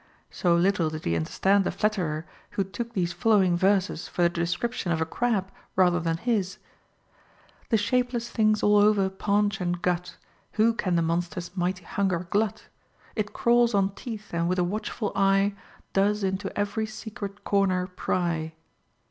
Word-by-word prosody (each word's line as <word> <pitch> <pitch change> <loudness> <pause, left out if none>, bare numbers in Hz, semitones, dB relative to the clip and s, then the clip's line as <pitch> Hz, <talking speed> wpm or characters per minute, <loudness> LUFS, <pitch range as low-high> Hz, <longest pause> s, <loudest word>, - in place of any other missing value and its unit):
So 175 -2 +2
little 175 -2 +2
did 155 0 -7
he 85 - +1
understand 195 - +2
the - - -1
flatterer 180 -6 -1 0.3
who 195 - +3
took 230 +5 -6
these 175 -4 -1
following 200 -6 +3
verses 190 -1 +1
for 175 - -1
the 170 - +5
de 170 0 -2
scription 210 0 -2
of 165 - +1
a 160 - +1
crab 195 +1 -1 0.2
rather 180 -2 +4
than 165 -1 -1
his: 200 -2 -1 0.5
— - - -31
The 225 - +4
shapeless 245 +2 0
thing's 215 -2 +1
all 210 0 +5
over 205 -2 +4
paunch 205 +1 0
and 175 0 -1
gut: 180 0 -2 0.4
Who 225 +2 +3
can 185 -5 -1
the 170 - +2
monster's 175 +2 -2
mighty 185 0 -1
hunger 185 -3 -1
glut? 210 0 0 0.5
It 210 -2 -2
crawls 235 -1 +3
on 195 -1 +2
teeth, 215 -3 -8
and 170 0 0
with 185 - 0
a 180 - +3
watchful 210 +3 -3
eye 195 +1 +3 0.4
Does 205 +1 +2
into 190 +1 -1
every 205 +2 -1
secret 215 -2 -7
corner 190 -2 +2
pry. 170 -3 -2
195 Hz, 165 wpm, -26 LUFS, 175-210 Hz, 0.5 s, the